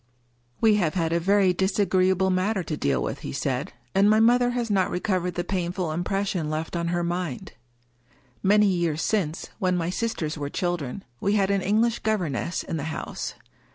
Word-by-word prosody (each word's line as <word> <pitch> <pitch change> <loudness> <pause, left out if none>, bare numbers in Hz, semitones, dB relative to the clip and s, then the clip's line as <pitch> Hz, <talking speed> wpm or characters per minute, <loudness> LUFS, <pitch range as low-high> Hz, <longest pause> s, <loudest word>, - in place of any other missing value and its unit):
" 120 0 -39
We 220 -2 +5
have 170 -5 0
had 165 -2 0
a 170 - +2
very 195 +1 +3
disagreeable 190 0 +2
matter 185 +1 0
to 155 - -3
deal 65 - 0
with," - - -3
he - - -6
said; 140 +4 -2 0.2
"and 195 +2 +5
my 215 +1 +5
mother 245 +2 +4
has 240 -2 -2
not 190 -2 +2
recovered 180 -1 -1
the 175 - -1
painful 180 -2 -2
impression 180 -1 -1
left 155 +2 -3
on 170 0 -1
her 175 0 0
mind. 175 -5 -3 0.9
Many 210 +2 +5
years 170 -5 +1
since, 175 -8 -1
when 185 -3 +1
my 170 0 -1
sisters 175 -8 -2
were 145 -1 -3
children, 175 0 -3 0.2
we 200 - +1
had 200 -2 +2
an 200 -1 +1
English 220 +5 +2
governess 180 - -1
in 165 - -4
the 145 - -4
house. 160 0 -5
180 Hz, 185 wpm, -25 LUFS, 165-200 Hz, 0.9 s, We